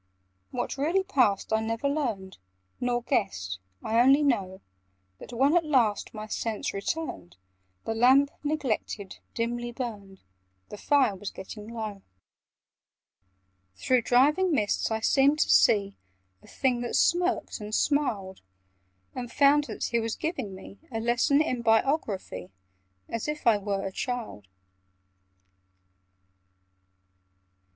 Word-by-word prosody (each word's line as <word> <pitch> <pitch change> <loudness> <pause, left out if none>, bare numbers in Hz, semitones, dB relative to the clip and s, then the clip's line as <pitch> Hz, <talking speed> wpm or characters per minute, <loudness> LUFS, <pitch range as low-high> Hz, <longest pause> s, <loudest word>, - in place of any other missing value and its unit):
What - - -4
really 340 +7 +1
passed 245 - +1
I 220 - +3
never 225 +4 -2
learned, 230 - -3 0.4
Nor 245 -1 -1
guessed: 95 - -1 0.2
I 225 +1 +1
only 270 +4 +5
know 195 -9 0 0.6
That, - - -11
when 270 +6 +2
at 345 - +4
last 245 -9 +1
my 215 -1 -7
sense 215 0 -3
returned, 200 - -4 0.5
The 225 - -1
lamp, 260 +5 +5
neglected, 255 -9 -3 0.2
dimly 240 +1 -2
burned— 210 -6 -7 0.5
The 210 - -8
fire 270 -8 +3
was 195 +2 -6
getting 210 +2 -9
low— 220 -3 -6 1.7
Through 250 - +2
driving 295 +11 +3
mists 210 -9 +1
I 220 0 -2
seemed 275 +5 +4
to - - +2
see 200 -3 +4 0.5
A - - -19
Thing 250 -2 0
that 240 - -3
smirked 355 -4 +1
and 210 0 -4
smiled: 215 -11 0 0.7
And 245 -2 -6
found 290 +1 +4
that - - -6
he 235 - +1
was 225 0 -2
giving 270 - -4
me 190 +1 -12
A 225 - -2
lesson 240 +6 +2
in 255 -6 -2
Biography, 225 - 0 0.6
As 230 +3 -4
if 300 -1 -4
I 225 -3 +5
were 200 -1 -2
a 195 - -3
child. 230 - -5
235 Hz, 125 wpm, -27 LUFS, 205-280 Hz, 1.7 s, only